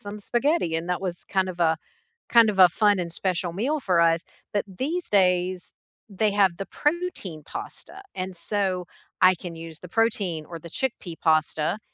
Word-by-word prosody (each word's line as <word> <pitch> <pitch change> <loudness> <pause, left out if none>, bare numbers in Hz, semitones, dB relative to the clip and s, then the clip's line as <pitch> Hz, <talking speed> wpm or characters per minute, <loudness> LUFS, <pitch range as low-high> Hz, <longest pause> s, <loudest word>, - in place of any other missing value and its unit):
some 205 +1 -6
spaghetti 240 - +1
and 165 +1 -4
that 180 - 0
was 180 -3 -4
kind 190 -1 0
of 180 -1 -6
a 160 -1 +3 0.5
kind 230 -2 +6
of 200 -2 -2
a 180 -1 +9
fun 205 +2 +3
and 170 -1 -3
special 180 -1 -1
meal 270 - 0
for 180 -7 +2
us, 165 0 +3 0.3
but 205 - +1
these 290 - -3
days, 180 -2 +2 0.4
they 210 +1 +1
have 195 -3 +3
the 195 - -4
protein 295 - -2
pasta, 395 - -7
and 185 0 -4
so 185 0 0 0.4
I 185 0 +7
can 170 -1 -8
use 165 -1 -9
the 180 - -10
protein 195 -7 0
or 170 - -8
the 170 - -10
chickpea 180 -6 -4
pasta, 155 +3 +2
185 Hz, 180 wpm, -25 LUFS, 170-210 Hz, 0.5 s, a